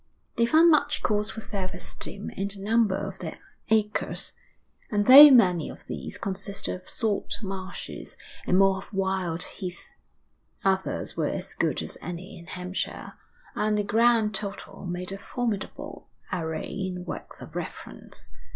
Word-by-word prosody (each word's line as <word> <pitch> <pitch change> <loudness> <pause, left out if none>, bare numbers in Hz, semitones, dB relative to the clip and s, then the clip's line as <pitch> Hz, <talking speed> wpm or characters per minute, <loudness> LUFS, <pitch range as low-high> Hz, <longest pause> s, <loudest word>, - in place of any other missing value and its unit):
They 235 0 +3
found 325 +6 +6
much 305 - +2
cause 210 0 +1
for 220 - -6
self 195 -4 -4
esteem 200 +2 -5
in 195 - -2
the 200 0 -8
number 215 0 +2
of - - -5
their - - -6 0.3
acres, 215 -1 +1 0.6
and, 205 -3 +1
though 285 +5 +12
many 180 - +5
of - - -11
these - - -5
consisted 195 +1 -3
of 185 0 -9
salt 215 -3 -1
marshes, 190 -1 -6 0.3
and 180 - +4
more 195 0 +5
of 195 - -12
wild 190 -4 -1
heath, 180 -3 -7 0.7
others 190 0 0
were - - 0
as - - -4
good - - 0
as - - -6
any 175 +2 -7
in 170 - -14
Hampshire; 180 +2 -4 0.4
and 210 0 +1
the 210 - +1
grand 225 +1 +3
total 200 -1 -5
made 180 +1 -4
a 195 - -5
formidable 225 -1 -4 0.3
array 160 -3 -3
in 185 -2 -4
works - - -7
of - - -11
reference. - - -7
195 Hz, 150 wpm, -27 LUFS, 185-215 Hz, 0.7 s, though